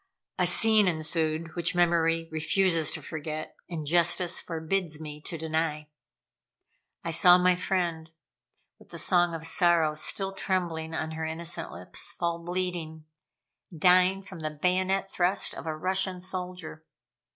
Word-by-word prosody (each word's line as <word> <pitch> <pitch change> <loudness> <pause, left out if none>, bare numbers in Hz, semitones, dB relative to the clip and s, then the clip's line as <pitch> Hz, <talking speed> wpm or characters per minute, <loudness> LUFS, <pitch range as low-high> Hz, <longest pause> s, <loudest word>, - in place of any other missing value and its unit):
A - - +3
scene 220 -3 +5
ensued 160 -1 -1
which 170 0 0
memory 165 -1 +2
refuses 165 0 +1
to - - -2
forget, 155 0 -6
and 160 -3 -5
justice 175 +2 +3
forbids 165 -1 -2
me 150 -1 -8
to 170 - -5
deny. 155 -1 -2 1.1
I 165 - -3
saw 180 +2 +6
my 180 0 +3
friend, 175 -3 -2 0.7
with - - -19
the - - -8
song 175 -2 +2
of 165 0 -7
sorrow 165 -2 +3
still 195 +5 -1
trembling 170 -4 -2
on 160 0 -3
her 160 0 -4
innocent 165 +2 -3
lips, 90 +2 -1
fall 170 -1 -2
bleeding, 170 -3 -4 0.7
dying 185 +3 +4
from 190 -3 -11
the 155 -1 -3
bayonet 185 +5 0
thrust 185 0 0
of - - -8
a 155 -1 -3
Russian 185 +2 -1
soldier. 180 -3 -5
170 Hz, 140 wpm, -27 LUFS, 160-180 Hz, 1.1 s, saw